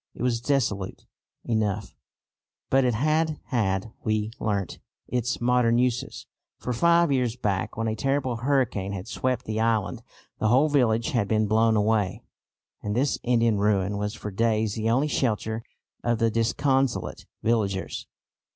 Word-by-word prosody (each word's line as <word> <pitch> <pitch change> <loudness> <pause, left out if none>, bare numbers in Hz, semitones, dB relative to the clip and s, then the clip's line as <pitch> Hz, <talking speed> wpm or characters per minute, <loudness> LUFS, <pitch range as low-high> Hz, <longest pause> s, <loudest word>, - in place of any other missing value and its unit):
It - - -5
was 120 -2 +1
desolate 110 -9 -1 0.4
enough, 105 -3 -1 0.8
but 135 0 +5
it 125 -3 +2
had 155 +4 +1
had, 105 -3 0
we 110 0 0
learnt, 100 -5 -2 0.3
its 125 0 -1
modern 120 -1 +3
uses; 125 +1 -1 0.3
for 125 - -3
five 170 +5 +4
years 125 -4 +1
back 100 -6 -2
when 115 0 -1
a 110 - -1
terrible 135 -1 0
hurricane 120 -6 0
had 95 +1 -6
swept 125 +1 -1
the 110 0 -2
island 110 -5 0 0.4
the 110 - +1
whole 130 +7 +4
village 115 -5 +2
had 110 -5 +1
been 110 0 +2
blown 110 +2 +3
away, 105 -3 +1 0.6
and 105 0 -3
this 135 +3 +1
Indian 115 -3 +2
ruin 100 -1 +1
was 105 +1 -3
for 105 - -6
days 110 0 +1
the 110 0 -1
only 130 +6 +2
shelter 110 -5 -1 0.4
of 120 -1 +1
the 115 0 +2
disconsolate 130 +3 0 0.2
villagers. 105 -4 -1
115 Hz, 150 wpm, -26 LUFS, 105-125 Hz, 0.8 s, but